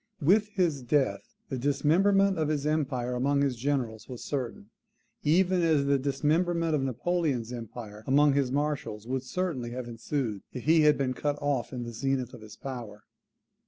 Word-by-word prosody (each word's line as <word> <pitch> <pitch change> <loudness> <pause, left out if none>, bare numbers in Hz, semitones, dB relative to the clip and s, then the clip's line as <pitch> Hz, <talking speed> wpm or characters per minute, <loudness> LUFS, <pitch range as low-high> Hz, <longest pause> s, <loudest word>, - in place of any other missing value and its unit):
With 200 +7 +4
his 175 -9 0
death 135 +2 +1 0.3
the 130 - -3
dismemberment 180 +8 +3
of 155 - +1
his 150 -2 -1
empire 135 -5 0
among 140 +3 +1
his 135 -3 +1
generals 120 -3 -2
was 125 -2 -7
certain, 120 -6 -4 0.5
even 180 +4 +3
as 155 -4 +3
the 140 0 +3
dismemberment 160 +5 +1
of 150 - +2
Napoleon's 135 -2 -1
empire 110 -2 -8
among 145 +2 +5
his 135 -3 +1
marshals 140 -6 -2
would 130 +2 -2
certainly 130 -3 -3
have 125 -1 -5
ensued, 115 -2 -3
if 125 - -6
he 160 +1 +5
had 150 -1 +5
been 130 -2 0
cut 145 +3 -1
off 145 -4 -1
in 125 -2 -4
the 120 0 -6
zenith 135 +2 -1
of 120 - -10
his 110 0 -11
power. 120 -6 -7
140 Hz, 170 wpm, -28 LUFS, 125-155 Hz, 0.5 s, among